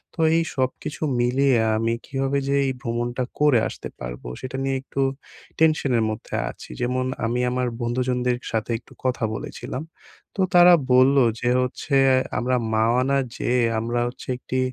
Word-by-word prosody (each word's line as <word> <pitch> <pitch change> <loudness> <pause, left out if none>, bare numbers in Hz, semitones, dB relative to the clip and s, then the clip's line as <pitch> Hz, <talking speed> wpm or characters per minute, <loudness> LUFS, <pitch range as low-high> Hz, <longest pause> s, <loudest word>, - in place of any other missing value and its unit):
তো - - -16 0.2
এই 165 - +3
সবকিছু 130 +3 -3 0.2
মিলিয়ে 130 +2 +3 0.2
আমি 115 +1 0
কিভাবে 135 +1 -1
যে 140 - +2
এই - - +1
ভ্রমণটা 120 +2 -2 0.2
করে 145 -5 +5
আসতে - - -7
পারবো - - -7
সেটা 130 +1 -5
নিয়ে 135 0 0
একটু 135 0 -4 0.6
টেনশন 155 -4 +3
এর 115 - +2
মধ্যে 110 - -6 0.2
আছি। - - -13
যেমন 130 +1 0 0.2
আমি 120 +2 0
আমার 125 0 0
বন্ধুজনদের 125 +1 0
সাথে 110 +1 -2
একটু - - -19
কথা 125 -2 0
বলেছিলাম। 130 +5 -6 0.5
তো 195 - +1
তারা 175 0 +8 0.2
বললো 130 +1 +6 0.2
যে 120 - +1
হচ্ছে 125 +3 -2 0.4
আমরা 125 +1 +1 0.2
মাওয়া 115 +3 +3
না 140 - +3 0.2
যেয়ে, 125 0 +1 0.2
আমরা 120 +2 -1
হচ্ছে 120 - -9
একটি 130 +1 -3
125 Hz, 160 wpm, -23 LUFS, 120-135 Hz, 0.6 s, তারা